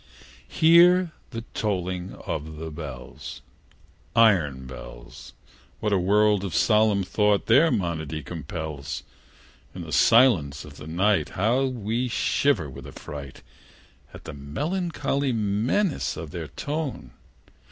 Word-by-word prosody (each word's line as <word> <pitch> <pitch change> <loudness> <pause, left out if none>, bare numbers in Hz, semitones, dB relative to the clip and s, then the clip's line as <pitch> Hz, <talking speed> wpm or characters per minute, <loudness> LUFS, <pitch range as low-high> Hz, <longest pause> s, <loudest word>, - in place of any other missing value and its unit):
IV. - - -15
Hear 175 +2 +6 0.2
the 115 -2 -6
tolling 90 -3 -2
of 80 +1 -4
the 80 0 -6
bells 70 -5 -8 0.7
Iron 85 - +3
bells! - - -11 0.5
What 105 -1 0
a 95 - +3
world 105 +2 +3
of 90 -4 -4
solemn 105 -2 +3
thought 105 +2 +1
their 140 +9 +5
monody 80 - -2
compels! 80 -3 -6 0.7
In - - -6
the - - -9
silence 80 - +4
of - - -13
the 75 - -10
night, 95 +6 +1
How 120 +8 +2
we 120 -1 -2
shiver 125 - +1
with 65 0 -10
affright 70 -2 -9 0.7
At - - -12
the - - -8
melancholy 140 - -2
menace 115 - 0
of - - -7
their - - -5
tone! 145 - -4
100 Hz, 120 wpm, -25 LUFS, 75-125 Hz, 0.7 s, Hear